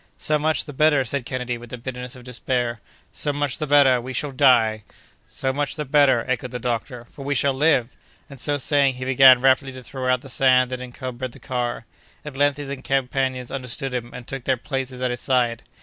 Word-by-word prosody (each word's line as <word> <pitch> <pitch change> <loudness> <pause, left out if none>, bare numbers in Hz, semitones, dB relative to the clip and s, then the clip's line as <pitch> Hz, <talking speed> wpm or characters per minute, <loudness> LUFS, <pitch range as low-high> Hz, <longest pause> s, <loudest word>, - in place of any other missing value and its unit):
"So 150 0 0
much 155 +1 +1
the 145 - -9
better!" 145 -1 +3
said 125 +1 -2
Kennedy, 125 -2 -3
with 120 0 -12
the 125 - -6
bitterness 125 0 -6
of 125 - -13
despair. 120 -2 -2 0.3
"So 145 - 0
much 145 -2 -2
the 155 - -2
better—we 130 -3 +4
shall 145 +3 -2
die!" 120 -5 +4 0.5
"So 130 0 -2
much 145 +1 -2
the 150 - -4
better!" 135 -4 +3
echoed 125 -1 -2
the 125 - -5
doctor, 120 0 -4
"for 140 - -12
we 145 +1 -1
shall 140 +1 +2
live!" 135 -4 +2 0.3
and, 140 -2 -12
so 145 +4 +1
saying, 140 -2 +2
he 130 0 -6
began 130 -1 +7
rapidly 135 0 +3
to 130 0 -10
throw 130 0 -2
out 125 -1 +1
the 135 - -12
sand 130 -1 +3
that 130 0 -4
encumbered 125 0 -6
the - - -14
car. 125 -3 -3 0.4
At 150 -3 -7
length 145 0 +2
his 145 -1 -6
companions 130 -2 -1
understood 135 +1 -5
him, 120 -1 -3
and 125 - -9
took 135 -1 -7
their 130 -1 +1
places 130 0 -4
at 125 - +1
his 120 - -4
side. 120 -3 +1
130 Hz, 210 wpm, -22 LUFS, 125-140 Hz, 0.5 s, began